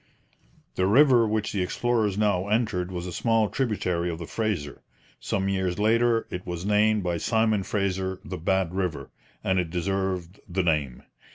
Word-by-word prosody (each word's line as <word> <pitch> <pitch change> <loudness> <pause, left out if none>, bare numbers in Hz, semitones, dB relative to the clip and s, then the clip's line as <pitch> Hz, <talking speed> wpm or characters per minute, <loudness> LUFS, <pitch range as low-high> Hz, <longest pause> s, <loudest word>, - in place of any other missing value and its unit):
The 95 - +2
river 125 0 +5
which 110 0 -1
the 100 - 0
explorers 110 +1 0
now 100 -3 +1
entered 105 -5 0
was 90 -1 -4
a 90 - -5
small 115 -2 +2
tributary 90 -9 -1
of 85 - -4
the 85 - -6
Fraser. 95 -9 -3 0.4
Some 95 0 -1
years 95 -2 -1
later 115 +2 +2
it 90 0 -4
was 90 0 -5
named 105 0 +3
by 90 -1 -1
Simon 110 0 +1
Fraser 95 -1 -2
the - - -6
Bad 95 0 0
River, 95 -3 -3 0.3
and 95 -1 +1
it 90 -2 -1
deserved 95 +1 -2
the 95 +1 0
name. 75 -7 0
95 Hz, 165 wpm, -26 LUFS, 90-110 Hz, 0.4 s, river